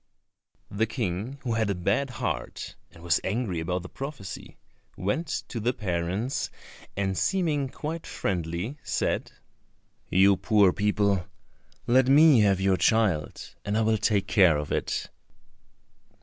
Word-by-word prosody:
The 110 Hz, +3 st, 0 dB
King, 110 Hz, +2 st, -3 dB
who 120 Hz, -3 st, -1 dB
had 110 Hz, -2 st, 0 dB
a 100 Hz, -, 0 dB
bad 100 Hz, +10 st, 0 dB
heart, 125 Hz, -, -4 dB
and 85 Hz, -1 st, -16 dB
was 85 Hz, -2 st, +2 dB
angry 100 Hz, -4 st, -1 dB
about 90 Hz, +2 st, -2 dB
the -, -, -7 dB
prophecy, 135 Hz, -4 st, -8 dB, 0.4 s
went 105 Hz, -, -1 dB, 0.2 s
to 120 Hz, -, -4 dB
the 120 Hz, +3 st, 0 dB
parents, 95 Hz, +3 st, -2 dB, 0.5 s
and, 95 Hz, -1 st, 0 dB
seeming 155 Hz, -, 0 dB
quite 160 Hz, +5 st, -5 dB
friendly, 90 Hz, -, -3 dB
said, 80 Hz, -3 st, -1 dB, 0.8 s
"You 95 Hz, +1 st, +5 dB
poor 100 Hz, -4 st, +4 dB
people, 100 Hz, -3 st, +1 dB, 0.6 s
let 130 Hz, +2 st, +4 dB
me 145 Hz, -1 st, +7 dB
have 100 Hz, -3 st, +3 dB
your 95 Hz, -1 st, +2 dB
child, 105 Hz, -10 st, +1 dB
and 100 Hz, +1 st, -1 dB
I -, -, +2 dB
will 110 Hz, -1 st, +2 dB
take 100 Hz, -3 st, +1 dB
care 95 Hz, -6 st, +4 dB
of 75 Hz, 0 st, -5 dB
it." -, -, -2 dB
105 Hz, 135 wpm, -27 LUFS, 90-125 Hz, 0.8 s, me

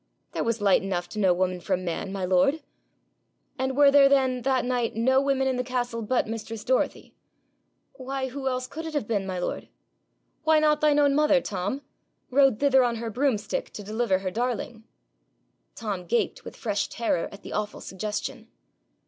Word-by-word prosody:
'There -, -, -2 dB
was 230 Hz, -1 st, -1 dB
light 200 Hz, -2 st, +4 dB
enough 180 Hz, -2 st, -2 dB
to 215 Hz, -, -6 dB
know 190 Hz, -3 st, +4 dB
woman 180 Hz, 0 st, 0 dB
from 185 Hz, +1 st, -2 dB
man, 175 Hz, +3 st, -3 dB
my 195 Hz, -2 st, -2 dB
lord.' 230 Hz, -, +2 dB, 1.0 s
'And 265 Hz, 0 st, -1 dB
were 285 Hz, -1 st, +7 dB
there 275 Hz, -1 st, +7 dB
then 260 Hz, -2 st, +2 dB
that 260 Hz, 0 st, +1 dB
night 245 Hz, -3 st, -1 dB
no 260 Hz, +4 st, +3 dB
women 270 Hz, -1 st, +1 dB
in 260 Hz, -1 st, 0 dB
the 250 Hz, -, 0 dB
castle 245 Hz, -2 st, -2 dB
but 235 Hz, +3 st, +1 dB
mistress 225 Hz, 0 st, -6 dB
Dorothy?' 260 Hz, 0 st, -1 dB, 0.8 s
'Why, 265 Hz, 0 st, -4 dB
who 270 Hz, +1 st, -5 dB
else 255 Hz, -1 st, -1 dB
could 320 Hz, +5 st, -7 dB
it 315 Hz, -, -6 dB
have 280 Hz, -8 st, -1 dB
been, 200 Hz, -4 st, -1 dB
my 185 Hz, -1 st, -3 dB
lord?' 180 Hz, -, -3 dB, 0.8 s
'Why 315 Hz, 0 st, +4 dB
not 305 Hz, -1 st, +3 dB
thine 300 Hz, -1 st, +4 dB
own 285 Hz, -1 st, +4 dB
mother, 300 Hz, -1 st, +4 dB
Tom 205 Hz, +5 st, -3 dB, 0.5 s
rode 270 Hz, -4 st, +4 dB
thither 265 Hz, -2 st, +5 dB
on 240 Hz, -1 st, +1 dB
her 230 Hz, 0 st, -4 dB
broomstick 225 Hz, -4 st, -1 dB
to 205 Hz, -, -7 dB
deliver 215 Hz, -1 st, 0 dB
her 185 Hz, -1 st, -4 dB
darling?' 235 Hz, 0 st, -3 dB, 0.9 s
Tom 195 Hz, -5 st, -4 dB
gaped 235 Hz, +4 st, 0 dB
with -, -, -9 dB
fresh 205 Hz, -3 st, -1 dB
terror 230 Hz, -8 st, -1 dB
at 200 Hz, -, -12 dB
the -, -, -7 dB
awful 210 Hz, 0 st, -3 dB
suggestion. 210 Hz, +2 st, -5 dB
240 Hz, 180 wpm, -26 LUFS, 205-270 Hz, 1.0 s, were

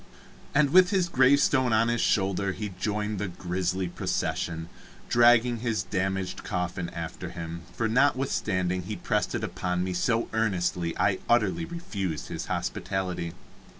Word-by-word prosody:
And 145 Hz, -1 st, +4 dB
with 185 Hz, +1 st, +7 dB
his 185 Hz, -3 st, +2 dB
gravestone 130 Hz, -3 st, +4 dB
on 110 Hz, +1 st, +4 dB
his 120 Hz, -1 st, +1 dB
shoulder 100 Hz, -1 st, +1 dB
he 105 Hz, +1 st, -4 dB
joined 105 Hz, -1 st, -1 dB
the 105 Hz, -, -1 dB
grisly 90 Hz, +1 st, -2 dB
procession, 80 Hz, -1 st, -2 dB, 0.4 s
dragging 120 Hz, 0 st, +5 dB
his 110 Hz, -4 st, -1 dB
damaged 95 Hz, 0 st, -2 dB
coffin 90 Hz, -1 st, -3 dB
after 85 Hz, -2 st, -6 dB
him, 85 Hz, 0 st, -6 dB
for 115 Hz, -, -1 dB
notwithstanding 110 Hz, -8 st, +1 dB
he 90 Hz, -, -5 dB
pressed -, -, -1 dB
it -, -, -2 dB
upon 90 Hz, 0 st, -2 dB
me 95 Hz, 0 st, -2 dB
so 115 Hz, +6 st, +1 dB
earnestly, 90 Hz, -6 st, 0 dB
I 95 Hz, -2 st, +2 dB
utterly 120 Hz, -, +2 dB
refused 105 Hz, -, -4 dB
his -, -, -5 dB
hospitality. 90 Hz, -3 st, -2 dB
100 Hz, 140 wpm, -27 LUFS, 90-120 Hz, 0.4 s, with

